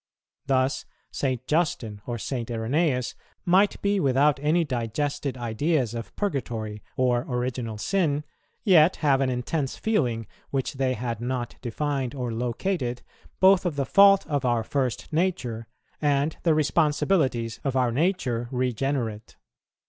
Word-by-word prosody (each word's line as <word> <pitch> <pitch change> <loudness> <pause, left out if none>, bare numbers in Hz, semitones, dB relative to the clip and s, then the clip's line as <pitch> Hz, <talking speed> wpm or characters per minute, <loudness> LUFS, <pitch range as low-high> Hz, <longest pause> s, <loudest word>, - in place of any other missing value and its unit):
Thus, 130 0 +1 0.3
St. 130 -3 -2
Justin 130 -10 -1
or 120 -1 -2
St. 120 +1 -4
Irenæus 125 +3 0 0.3
might 190 +3 +3
be 200 0 +2
without 140 -1 +3
any 155 +4 +2
digested 140 +1 -2
ideas 120 +2 0
of 115 -1 -7
Purgatory 115 - -3 0.2
or 125 -2 +2
Original 125 -3 -2
Sin, 150 - 0 0.4
yet 180 -5 +6
have 135 -2 +4
an 135 - +2
intense 130 +3 -2
feeling, 125 - 0 0.2
which 135 +2 -2
they 130 -1 0
had 115 0 -4
not 120 -1 -3
defined 135 +1 -2
or 125 -3 -3
located, 125 +2 -2 0.4
both 190 0 +6
of 175 -5 -1
the 140 -1 0
fault 195 +4 +6
of 145 -3 -1
our 120 -2 +1
first 130 +3 -2
nature 130 -10 -1 0.3
and 145 +1 +1
the 165 -3 +3
responsibilities 145 - +1
of 135 -2 -1
our 125 -2 +2
nature 125 -6 0
regenerate. 125 -3 -2
130 Hz, 135 wpm, -26 LUFS, 120-150 Hz, 0.4 s, yet